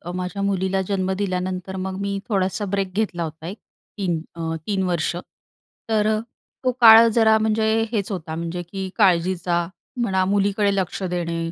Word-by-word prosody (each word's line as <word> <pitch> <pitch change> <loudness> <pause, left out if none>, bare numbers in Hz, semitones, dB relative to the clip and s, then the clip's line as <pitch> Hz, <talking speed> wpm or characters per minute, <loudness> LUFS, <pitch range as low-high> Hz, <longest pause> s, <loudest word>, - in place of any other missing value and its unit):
माझ्या 185 +2 -4
मुलीला 190 -1 0
जन्म 190 -2 -1
दिल्यानंतर, 185 -1 -3
मग 190 0 -4
मी 200 0 -2
थोडासा 195 0 0
ब्रेक 195 -2 -1
घेतला 195 -5 -1
होता, 160 0 -7
एक 195 +5 -6 0.4
3 175 -5 -1
अ, 165 -1 -3
3 200 -2 0
वर्ष. 175 -2 0 0.7
तर 215 -1 +2
अ, - - -2 0.4
तो 255 - +2
काळ 225 0 +10
जरा 220 -1 +5
म्हणजे 220 0 +1 0.2
हेच 210 -3 -1
होता, 160 -4 -4
म्हणजे 170 +2 -4
की 195 -1 -4
काळजीचा 175 -3 +2 0.4
म्हणा, 190 -5 +1
मुलीकडे 200 +1 +1
लक्ष 190 0 -2
देणे 170 -2 -2
190 Hz, 155 wpm, -22 LUFS, 175-205 Hz, 0.7 s, काळ